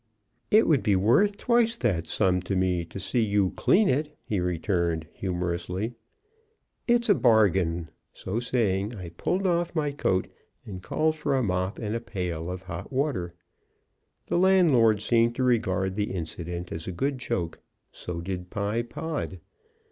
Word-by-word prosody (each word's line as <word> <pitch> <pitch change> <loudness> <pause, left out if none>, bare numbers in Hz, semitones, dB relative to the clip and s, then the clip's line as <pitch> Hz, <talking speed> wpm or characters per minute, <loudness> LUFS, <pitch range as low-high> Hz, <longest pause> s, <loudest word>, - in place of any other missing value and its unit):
"It 215 +2 +5
would 150 -7 +4
be 100 0 +2
worth 125 - +3
twice 235 -1 +2
that 90 -9 -1
sum 90 -3 +2
to 95 - +1
me 90 -2 +1
to 90 - -8
see 115 +6 0
you 100 -3 +2
clean 210 +1 +3
it," 150 +3 -1
he 105 - -2
returned, 85 -2 -1
humorously. 90 +3 -3 0.9
"It's 240 -1 +3
a 205 - +6
bargain!" 95 - +3 0.2
so 105 +5 -4
saying, 110 -3 0
I 90 -4 -7
pulled 180 - -2
off 175 -1 0
my 150 -2 0
coat, 95 -9 0 0.4
and 95 -3 -7
called 155 +10 0
for 145 -2 0
a 130 - +1
mop 95 -1 -1
and 110 -1 -3
a 115 - -2
pail 90 -7 -4
of 90 +1 -5
hot 85 +6 -7
water. 130 - -1 0.9
The - - 0
landlord 145 - +4
seemed 115 0 +3
to 130 - -1
regard 95 -6 +1
the 105 +1 -1
incident 85 0 -5
as 80 - -5
a - - -2
good 135 +8 -2
joke; 85 -9 -3 0.3
so 85 -1 -6
did 90 0 -5
Pye 105 +4 -1
Pod. 120 - -5
105 Hz, 160 wpm, -27 LUFS, 90-135 Hz, 0.9 s, a